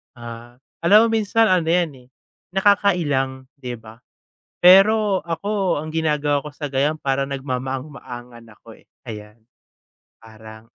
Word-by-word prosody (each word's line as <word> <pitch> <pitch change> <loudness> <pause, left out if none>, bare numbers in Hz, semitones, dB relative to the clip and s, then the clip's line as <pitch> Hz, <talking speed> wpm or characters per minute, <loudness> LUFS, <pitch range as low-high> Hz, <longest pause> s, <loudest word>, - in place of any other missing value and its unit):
Ah, 120 +1 -11 0.2
alam 215 +5 +6
mo 225 - +1
minsan 220 +1 +2
ano 180 -3 +2
yan 170 0 +2 0.2
eh, - - -27 0.5
nakakailang, 155 -10 +1
di 125 -3 -6
ba? 110 -1 -12 0.6
Pero 195 +2 +5
ako 185 0 -1
ang 155 - -7
ginagawa 150 -3 0
ko 150 - -5
sa 145 -1 -6
ganiyan 140 +3 0
parang 135 0 -1
nagmamaang-maangan 130 -2 -6
ako 115 +1 -16
eh, - - -26 0.2
ayan. 105 +1 -10 0.8
Parang, 110 0 -14
140 Hz, 130 wpm, -21 LUFS, 120-180 Hz, 0.8 s, alam